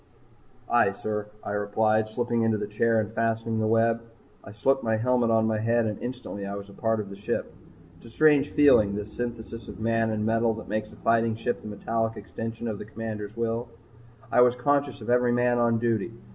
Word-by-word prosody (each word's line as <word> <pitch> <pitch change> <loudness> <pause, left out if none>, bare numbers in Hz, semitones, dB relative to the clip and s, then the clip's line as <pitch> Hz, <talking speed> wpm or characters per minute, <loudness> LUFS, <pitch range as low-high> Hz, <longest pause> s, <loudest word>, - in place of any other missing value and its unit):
"Aye, 120 -5 +3
sir," 105 +1 -4 0.2
I - - -4
replied, 110 +1 +1
slipping 120 +1 -1
into 110 -1 +2
the 105 - -3
chair 110 +2 +1
and 110 0 -3
fastening 115 0 0
the 110 - +1
web. 115 +1 +2 0.4
I 100 - -10
slipped 135 +6 +1
the 110 -1 +1
helmet 125 0 +2
on 110 -1 +3
my 110 -1 0
head 115 +1 +2
and 105 -2 -3
instantly 125 -5 -6
I 100 0 -4
was 100 0 -8
a - - -13
part 110 +1 0
of 100 -2 -5
the - - -7
ship. 100 - -3 0.4
It's 100 - -15
a - - -12
strange 145 +3 +4
feeling, 110 -9 +5
this 105 +1 -6
synthesis 115 -1 -5
of - - -9
man 115 0 +1
and 110 -1 -1
metal 115 0 +2
that 110 - -9
makes 105 0 -3
a - - -14
fighting 115 -1 +2
ship 115 +2 -2
the - - -9
metallic 115 +2 -2
extension 115 +5 -6
of 110 -3 -3
the - - -7
Commander's 110 -1 -6
will. 115 +1 -2 0.6
I 125 - +5
was 125 0 +5
conscious 140 +1 0
of - - -3
every 125 0 +3
man 120 0 +2
on 115 -1 +3
duty. 115 -2 0
115 Hz, 215 wpm, -26 LUFS, 105-120 Hz, 0.6 s, feeling